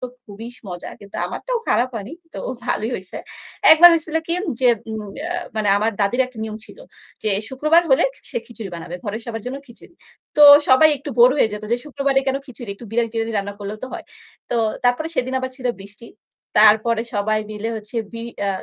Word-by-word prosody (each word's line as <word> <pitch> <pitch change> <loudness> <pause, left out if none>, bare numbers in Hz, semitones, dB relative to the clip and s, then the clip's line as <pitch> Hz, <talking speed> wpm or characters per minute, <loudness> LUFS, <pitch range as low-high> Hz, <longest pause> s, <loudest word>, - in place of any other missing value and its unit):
তো 255 - -4 0.2
খুবই 215 +3 -9
স - - -18
মজা। 175 -1 -7
কিন্তু 200 0 -11
আমারটাও - - -3
খারাপ 245 - +2
হয়নি, 220 +4 -6 0.2
তো - - -5 0.3
ভালোই 220 +3 -1
হইছে। 185 -1 -10 0.6
একবার 335 +2 +10
হইছিল 320 -1 -2
কি? 335 - -2 0.3
যে 255 - +3 0.2
উম 220 -1 -4 0.2
অ্যা 345 +4 -3 0.2
মানে 215 -1 0
আমার 215 +2 +1
দাদীর 200 +6 +1
একটা 255 -3 -15
নিয়ম 215 -1 -6
ছিল, - - -15 0.4
যে 215 - 0 0.2
শুক্রবার 305 +6 +3
হলে 265 - +5 0.3
সে - - -6
খিচুড়ি 225 -5 -8
বানাবে, 170 +1 -7
ঘরের 215 +2 -4
সবার 225 -2 -5
জন্য 260 +2 -4
খিচুড়ি। 240 +7 -17 0.4
তো 300 - +6 0.3
সবাই 260 +5 +7
একটু 280 +2 -8
বোর 240 +1 +8
হয়ে 230 - +3
যেত 210 0 -6
যে - - +3
শুক্রবারে 275 -2 0
কেনো 270 +1 0
খিচুড়ি? 240 -4 -9
একটু 230 +4 -12
বিরিয়ানি-টিরিয়ানি 225 0 -1
রান্না 200 0 -4
করলেও 205 +1 -6
তো - - -3
হয়। - - -6 0.5
তো 240 - 0 0.3
তারপরে 245 +6 +2
সেদিন 260 -2 -1
আবার 260 0 -4
ছিল 255 -2 -5
বৃষ্টি। 205 +4 -13 0.5
তারপরে 220 +2 +5
সবাই 215 +1 +1
মিলে 215 +1 -4
হচ্ছে 215 +2 -9 0.2
বি 230 - -6 0.3
আ - - +1
230 Hz, 195 wpm, -21 LUFS, 210-265 Hz, 0.6 s, একবার